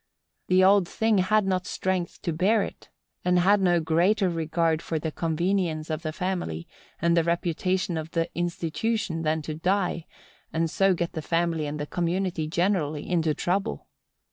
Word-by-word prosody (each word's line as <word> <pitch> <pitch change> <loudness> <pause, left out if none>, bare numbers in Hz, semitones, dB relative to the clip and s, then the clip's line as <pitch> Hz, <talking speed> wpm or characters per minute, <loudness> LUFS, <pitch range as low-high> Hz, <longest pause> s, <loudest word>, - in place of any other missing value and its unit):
The 185 0 +4
old 195 -1 +5
thing 220 0 +1
had 210 +3 +3
not 185 -1 -1
strength 185 -2 -2
to 170 - -1
bear 200 +6 +3
it, - - -9 0.3
and 180 0 +3
had 195 +3 +4
no 175 -2 +3
greater 180 +5 +2
regard 165 0 0
for 165 - -2
the 155 +1 -3
convenience 165 -1 -1
of 155 +1 -2
the 155 - -3
family, 175 - -3 0.3
and 170 +1 +2
the 170 - +4
reputation 175 +1 0
of 160 0 -4
"the 165 0 0
institution," 175 +2 -1
than 155 0 0
to 155 - -4
die, 180 +1 -1 0.4
and 165 0 0
so 195 -1 +3
get 170 0 -2
the 160 - -3
family 165 -1 0
and 150 +1 -4
the 150 - -2
community 175 0 -1
generally 160 -3 0
into 165 -4 +1
trouble. 195 +5 -2
170 Hz, 170 wpm, -26 LUFS, 160-190 Hz, 0.4 s, old